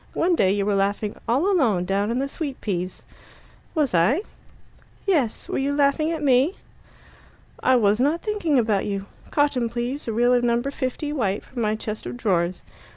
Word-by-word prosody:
One 350 Hz, +2 st, +2 dB
day 190 Hz, -, +3 dB
you 200 Hz, 0 st, 0 dB
were 205 Hz, -, +1 dB
laughing 200 Hz, +1 st, 0 dB
alone 345 Hz, -, +2 dB
all 215 Hz, -8 st, +2 dB
down 195 Hz, +3 st, 0 dB
in 235 Hz, -, -1 dB
the 275 Hz, +1 st, 0 dB
sweet 280 Hz, -2 st, -5 dB
peas." 185 Hz, -3 st, -3 dB, 0.7 s
"Was 295 Hz, -, +1 dB
I?" 215 Hz, -, +3 dB, 0.8 s
"Yes. 300 Hz, -, 0 dB
Were -, -, -2 dB
you 280 Hz, +1 st, 0 dB
laughing 290 Hz, +2 st, +2 dB
at 320 Hz, -2 st, -3 dB
me?" 275 Hz, +6 st, +3 dB, 1.1 s
"I 260 Hz, -, +4 dB
was 210 Hz, -2 st, +3 dB
not 295 Hz, +6 st, +1 dB
thinking 410 Hz, -9 st, 0 dB
about 215 Hz, -5 st, +1 dB
you. 200 Hz, -1 st, -3 dB, 0.2 s
Cotton, 280 Hz, -5 st, +1 dB
please 240 Hz, +4 st, -4 dB
a -, -, 0 dB
reel 240 Hz, +3 st, +3 dB
of 245 Hz, -1 st, +3 dB
No. 235 Hz, -1 st, +2 dB
50 275 Hz, +2 st, -3 dB
white 205 Hz, -8 st, -1 dB
from 245 Hz, -, -6 dB
my 215 Hz, -1 st, +1 dB
chest 215 Hz, 0 st, -5 dB
of -, -, -6 dB
drawers. 180 Hz, -6 st, 0 dB
245 Hz, 180 wpm, -24 LUFS, 205-285 Hz, 1.1 s, I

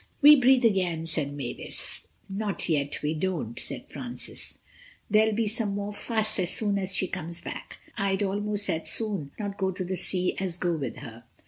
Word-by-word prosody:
"We 300 Hz, +1 st, +11 dB
breathe 260 Hz, -2 st, +5 dB
again," 180 Hz, -6 st, +2 dB
said 155 Hz, -3 st, 0 dB
Mavis. 135 Hz, -4 st, -4 dB, 0.2 s
"Not 200 Hz, -1 st, -1 dB
yet 145 Hz, -3 st, 0 dB
we 150 Hz, +1 st, +1 dB
don't," 160 Hz, -8 st, -2 dB
said -, -, -3 dB
Francis, 245 Hz, -1 st, -5 dB, 0.5 s
"there'll 215 Hz, 0 st, +4 dB
be 225 Hz, 0 st, +1 dB
some 210 Hz, -2 st, -1 dB
more 205 Hz, +1 st, -3 dB
fuss 215 Hz, 0 st, +1 dB
as 180 Hz, -2 st, +2 dB
soon 205 Hz, 0 st, +3 dB
as 190 Hz, 0 st, 0 dB
she 185 Hz, +2 st, +3 dB
comes 170 Hz, -2 st, -4 dB
back. -, -, -7 dB, 0.2 s
I'd 195 Hz, -1 st, +1 dB
almost 205 Hz, +1 st, -1 dB
as 160 Hz, 0 st, +1 dB
soon 200 Hz, -10 st, 0 dB
not 205 Hz, -2 st, -5 dB
go 190 Hz, -1 st, +1 dB
to 185 Hz, 0 st, -3 dB
the 185 Hz, +1 st, -3 dB
sea 180 Hz, 0 st, +1 dB
as 185 Hz, -3 st, -2 dB
go 175 Hz, -1 st, 0 dB
with 135 Hz, -7 st, -4 dB
her." 115 Hz, -3 st, -10 dB
190 Hz, 185 wpm, -27 LUFS, 165-210 Hz, 0.5 s, We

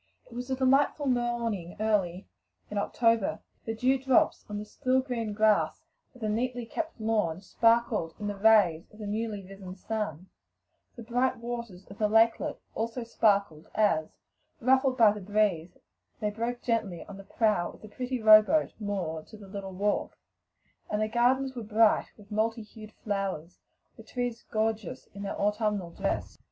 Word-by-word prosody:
It -, -, -16 dB
was 245 Hz, +2 st, -6 dB
a 260 Hz, -, +1 dB
delightful 270 Hz, +3 st, +2 dB
morning 235 Hz, -8 st, -1 dB
early 195 Hz, -4 st, 0 dB, 0.5 s
in 205 Hz, -, -1 dB
October: 230 Hz, 0 st, +1 dB, 0.3 s
the 225 Hz, -, -3 dB
dew 260 Hz, +3 st, +2 dB
drops 265 Hz, -1 st, +2 dB
on 210 Hz, -, -4 dB
the 210 Hz, -, -5 dB
still 255 Hz, +4 st, +1 dB
green 245 Hz, -4 st, -3 dB
grass 215 Hz, 0 st, +2 dB, 0.3 s
of 250 Hz, -, -16 dB
the 215 Hz, -, -1 dB
neatly 240 Hz, +3 st, -1 dB
kept 320 Hz, +4 st, -5 dB
lawn 210 Hz, -7 st, 0 dB
sparkled 230 Hz, -4 st, +1 dB
in 210 Hz, -, -5 dB
the 205 Hz, 0 st, -2 dB
rays 195 Hz, -6 st, +4 dB
of 210 Hz, -, -17 dB
the 215 Hz, -, -7 dB
newly 210 Hz, -1 st, -3 dB
risen 190 Hz, -1 st, -9 dB
sun; 190 Hz, -4 st, -4 dB, 0.7 s
the 235 Hz, -, -9 dB
bright 245 Hz, +3 st, 0 dB
waters 235 Hz, -5 st, -6 dB
of 195 Hz, -, -13 dB
the 210 Hz, -1 st, +2 dB
lakelet 225 Hz, +1 st, +3 dB, 0.2 s
also, 230 Hz, +2 st, -3 dB, 0.7 s
as, 180 Hz, -8 st, +2 dB, 0.5 s
ruffled 260 Hz, +1 st, +3 dB
by 225 Hz, -4 st, +7 dB
the 210 Hz, 0 st, -6 dB
breeze, 190 Hz, -4 st, 0 dB, 0.4 s
they 210 Hz, -2 st, -1 dB
broke 235 Hz, +3 st, -3 dB
gently 220 Hz, -7 st, -1 dB
about 200 Hz, -, -10 dB
the 195 Hz, -, -10 dB
prow 205 Hz, -3 st, +1 dB
of -, -, -17 dB
the -, -, -9 dB
pretty 250 Hz, +4 st, -4 dB
row 215 Hz, -1 st, +9 dB
boat 305 Hz, +8 st, +1 dB
moored 180 Hz, -7 st, -3 dB
to 215 Hz, -, -12 dB
the 205 Hz, -2 st, -12 dB
little 195 Hz, -1 st, -6 dB
wharf; 205 Hz, +3 st, -1 dB, 0.8 s
the 215 Hz, +1 st, 0 dB
gardens 255 Hz, +4 st, +2 dB
were 240 Hz, -, -4 dB
gay 220 Hz, 0 st, +3 dB
with 205 Hz, -1 st, -17 dB
bright 220 Hz, +2 st, +1 dB
hued 215 Hz, -1 st, -11 dB
flowers, 195 Hz, -6 st, -4 dB, 0.4 s
the -, -, -10 dB
trees 245 Hz, -2 st, -4 dB
gorgeous 220 Hz, -3 st, -2 dB
in 200 Hz, -, -8 dB
their 200 Hz, -, -4 dB
autumnal 210 Hz, -3 st, 0 dB
dress. -, -, -3 dB
215 Hz, 165 wpm, -29 LUFS, 200-235 Hz, 0.8 s, row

